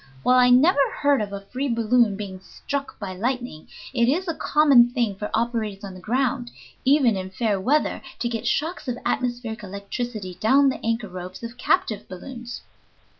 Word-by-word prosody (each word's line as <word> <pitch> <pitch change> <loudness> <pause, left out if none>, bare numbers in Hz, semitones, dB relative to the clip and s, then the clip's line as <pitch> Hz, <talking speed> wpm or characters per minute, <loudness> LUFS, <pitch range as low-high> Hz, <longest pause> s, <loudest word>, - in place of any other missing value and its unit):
While 255 0 +5
I 250 0 +6
never 285 +6 +5 0.2
heard 285 -4 +3
of 205 -1 -4
a 200 0 -5
free 260 +7 -3
balloon 230 -2 +3
being 195 -2 -6
struck 280 +8 -5
by 195 -3 -5
lightning, 245 -5 -3 0.3
it 235 -1 +3
is 360 +7 0
a 330 - 0
common 280 -7 +5
thing 240 -4 0
for 210 +2 -5
operators 220 -3 -1
on 195 -2 -7
the 185 - -10
ground 245 +4 -1 0.3
even 265 -5 +4
in 190 0 -4
fair 205 +1 0
weather 290 +9 +1 0.2
to 240 - -1
get 235 0 -3
shocks 310 +5 -1
of 245 -1 -2
atmospheric 240 -3 -2
electricity 200 0 -5
down 270 +5 +5
the 265 - -5
anchor 230 -1 -1
ropes 185 +2 -8
of 230 +1 -6
captive 220 -3 0
balloons." 240 +6 -8
235 Hz, 175 wpm, -24 LUFS, 205-255 Hz, 0.3 s, I